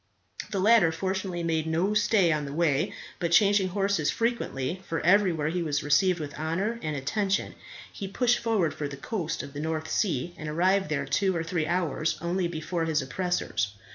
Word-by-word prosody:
The 200 Hz, -, -3 dB
latter 205 Hz, -4 st, +5 dB
fortunately 185 Hz, 0 st, -3 dB
made 160 Hz, -1 st, 0 dB
no 170 Hz, +6 st, +1 dB
stay 210 Hz, -4 st, +3 dB
on 150 Hz, -1 st, 0 dB
the 140 Hz, -, -6 dB
way, 155 Hz, +1 st, +1 dB, 0.3 s
but 170 Hz, -2 st, -1 dB
changing 200 Hz, +1 st, +5 dB
horses 195 Hz, -4 st, 0 dB
frequently 190 Hz, -, -2 dB
for 165 Hz, -, -1 dB
everywhere 175 Hz, -4 st, +3 dB
he 175 Hz, +2 st, -1 dB
was 150 Hz, -3 st, -1 dB
received 170 Hz, +5 st, +3 dB
with 145 Hz, -2 st, -5 dB
honour 190 Hz, +9 st, -1 dB
and 155 Hz, -1 st, -3 dB
attention 195 Hz, +8 st, -1 dB, 0.4 s
he 195 Hz, -, -5 dB
pushed 245 Hz, +5 st, +2 dB
forward 215 Hz, -8 st, +1 dB
for 145 Hz, -, -4 dB
the 140 Hz, 0 st, -8 dB
coast 165 Hz, +1 st, -3 dB
of 140 Hz, -, -9 dB
the 145 Hz, -, -6 dB
North 160 Hz, 0 st, -3 dB
Sea, 175 Hz, -, 0 dB
and 155 Hz, -1 st, -5 dB
arrived 185 Hz, +5 st, +2 dB
there 140 Hz, -2 st, -1 dB
two 190 Hz, +6 st, +1 dB
or 165 Hz, -, -1 dB
three 165 Hz, -1 st, -1 dB
hours 160 Hz, -2 st, 0 dB
only 175 Hz, +1 st, -1 dB
before 165 Hz, 0 st, -3 dB
his 155 Hz, -3 st, 0 dB
oppressors. 130 Hz, -, -2 dB
170 Hz, 185 wpm, -27 LUFS, 155-195 Hz, 0.4 s, latter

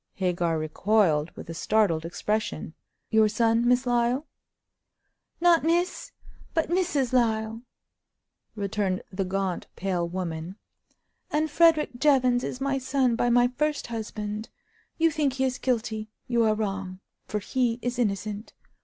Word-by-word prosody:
Hagar 175 Hz, -3 st, 0 dB
recoiled, 155 Hz, 0 st, +2 dB
with -, -, -8 dB
a 165 Hz, -, -5 dB
startled 170 Hz, -3 st, +1 dB
expression. 175 Hz, -1 st, -2 dB, 0.4 s
"Your 220 Hz, -1 st, +5 dB
son, 230 Hz, +2 st, +2 dB
Miss 250 Hz, +1 st, +3 dB
Lyle?" 245 Hz, +3 st, +1 dB, 1.1 s
"Not 340 Hz, -2 st, +5 dB
Miss, 345 Hz, +3 st, 0 dB, 0.4 s
but 325 Hz, -1 st, +1 dB
Mrs. 320 Hz, -9 st, +1 dB
Lyle," 225 Hz, -2 st, +1 dB, 0.9 s
returned 200 Hz, -2 st, -1 dB
the 195 Hz, +1 st, -1 dB
gaunt, 190 Hz, -1 st, -2 dB
pale 180 Hz, -2 st, -1 dB
woman; 170 Hz, -1 st, -4 dB, 0.7 s
"and 305 Hz, 0 st, 0 dB
Frederick 310 Hz, -6 st, +3 dB
Jevons 255 Hz, -4 st, +3 dB
is 255 Hz, -, -4 dB
my 275 Hz, 0 st, 0 dB
son 260 Hz, -2 st, +1 dB
by 240 Hz, +1 st, +1 dB
my 245 Hz, +1 st, +4 dB
first 300 Hz, -1 st, 0 dB
husband. 215 Hz, -1 st, -4 dB, 0.5 s
You 330 Hz, 0 st, +3 dB
think 295 Hz, -4 st, 0 dB
he 265 Hz, 0 st, -1 dB
is 255 Hz, -1 st, -1 dB
guilty; 220 Hz, -3 st, -1 dB, 0.2 s
you 235 Hz, -1 st, +2 dB
are 215 Hz, -1 st, +3 dB
wrong, 195 Hz, -3 st, -3 dB, 0.3 s
for 210 Hz, -, -2 dB
he 235 Hz, +2 st, 0 dB
is 245 Hz, 0 st, -2 dB
innocent. 210 Hz, -1 st, -2 dB
225 Hz, 135 wpm, -26 LUFS, 195-260 Hz, 1.1 s, Your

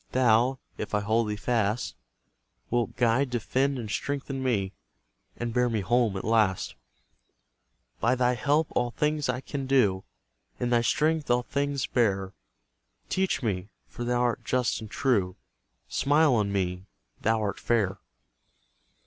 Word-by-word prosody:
Thou, 125 Hz, +1 st, +4 dB, 0.2 s
if 105 Hz, -, -3 dB
I 105 Hz, -, +1 dB
hold 110 Hz, +1 st, +1 dB
thee 105 Hz, -, -1 dB
fast, 110 Hz, 0 st, -1 dB, 0.8 s
Wilt 120 Hz, -1 st, 0 dB
guide, 125 Hz, +3 st, +2 dB
defend, 130 Hz, +3 st, 0 dB
and 115 Hz, -3 st, -5 dB
strengthen 135 Hz, +2 st, -3 dB
me, 105 Hz, -7 st, 0 dB, 0.6 s
And 120 Hz, -1 st, -3 dB
bear 125 Hz, 0 st, +2 dB
me 110 Hz, -3 st, 0 dB
home 115 Hz, -1 st, +2 dB
at 95 Hz, -, -5 dB
last; 105 Hz, -4 st, +2 dB, 1.3 s
By 120 Hz, +2 st, +2 dB
thy 125 Hz, 0 st, +2 dB
help 145 Hz, +5 st, +1 dB
all 120 Hz, 0 st, 0 dB
things 150 Hz, +2 st, -1 dB
I 125 Hz, +1 st, -1 dB
can 135 Hz, -1 st, -5 dB
do, 105 Hz, -9 st, +3 dB, 0.6 s
In 120 Hz, 0 st, -1 dB
thy 120 Hz, -1 st, +4 dB
strength 155 Hz, +5 st, +1 dB
all 120 Hz, 0 st, +3 dB
things 140 Hz, 0 st, -1 dB
bear, 95 Hz, -5 st, 0 dB, 0.8 s
Teach 190 Hz, -7 st, 0 dB
me, 100 Hz, -3 st, -2 dB, 0.2 s
for 120 Hz, -, -7 dB
thou 120 Hz, 0 st, +1 dB
art 120 Hz, -1 st, 0 dB
just 125 Hz, -2 st, 0 dB
and 110 Hz, -, -8 dB
true, 105 Hz, -9 st, +1 dB, 0.5 s
Smile 145 Hz, 0 st, +3 dB
on 105 Hz, -4 st, +1 dB
me, 90 Hz, -1 st, -2 dB, 0.3 s
thou 110 Hz, +1 st, +2 dB
art 100 Hz, -2 st, -2 dB
fair! 105 Hz, -5 st, 0 dB
120 Hz, 145 wpm, -27 LUFS, 105-130 Hz, 1.3 s, Thou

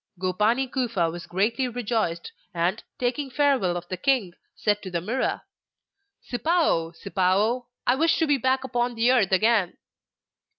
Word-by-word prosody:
Gopani 210 Hz, +8 st, +1 dB
Kufa 230 Hz, -10 st, -1 dB
was 170 Hz, 0 st, -8 dB
greatly 230 Hz, +8 st, 0 dB
rejoiced, 225 Hz, -8 st, -2 dB, 0.2 s
and, 175 Hz, +5 st, 0 dB, 0.2 s
taking 265 Hz, +2 st, -1 dB
farewell 260 Hz, -10 st, +2 dB
of 175 Hz, 0 st, -7 dB
the 185 Hz, -, -4 dB
king, 250 Hz, -9 st, +1 dB, 0.2 s
said 205 Hz, -1 st, 0 dB
to 190 Hz, -, -7 dB
the 175 Hz, -2 st, -2 dB
Mirror: 225 Hz, +10 st, -2 dB, 0.8 s
'Sipao, 255 Hz, -, +1 dB
Sipao, 205 Hz, +5 st, +1 dB, 0.2 s
I 245 Hz, -, +4 dB
wish 320 Hz, +5 st, +2 dB
to 325 Hz, -, +2 dB
be 290 Hz, -3 st, +2 dB
back 260 Hz, +2 st, +1 dB
upon 245 Hz, -2 st, -1 dB
the 230 Hz, +2 st, +3 dB
Earth 215 Hz, -8 st, +3 dB
again! 205 Hz, -1 st, +2 dB
230 Hz, 145 wpm, -25 LUFS, 185-260 Hz, 0.8 s, I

